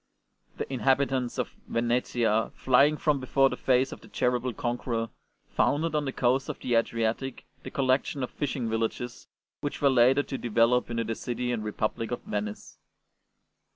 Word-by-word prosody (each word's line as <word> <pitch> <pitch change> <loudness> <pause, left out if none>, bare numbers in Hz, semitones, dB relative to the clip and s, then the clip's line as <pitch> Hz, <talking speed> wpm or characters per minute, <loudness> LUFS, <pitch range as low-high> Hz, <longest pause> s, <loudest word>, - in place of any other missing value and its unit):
The - - -3
inhabitants 130 -1 +1
of - - -2 0.2
Venetia, 115 -2 +1
flying 140 +4 +4
from 150 -2 +1
before 135 +1 +3
the - - -2
face 130 0 +2
of - - -9
the - - -14
terrible 125 0 0
conqueror, 120 -1 -2 0.4
founded 160 +2 +1
on 150 -1 0
the 135 - -2
coast 130 +1 +1
of - - -4
the 125 - -2
Adriatic 115 +2 0 0.2
the - - -7
collection 135 0 0
of 125 - -4
fishing 135 -4 -2
villages 115 +2 -3 0.3
which 145 - -4
were 140 -2 +4
later 130 +3 +5
to 135 - -5
develop 120 +2 +2
into 115 -1 -1
the 115 0 -2
city 125 +2 -3
and 115 -3 -2
republic 110 +1 -2
of 120 - -4
Venice. 105 0 -5
125 Hz, 160 wpm, -28 LUFS, 115-135 Hz, 0.4 s, later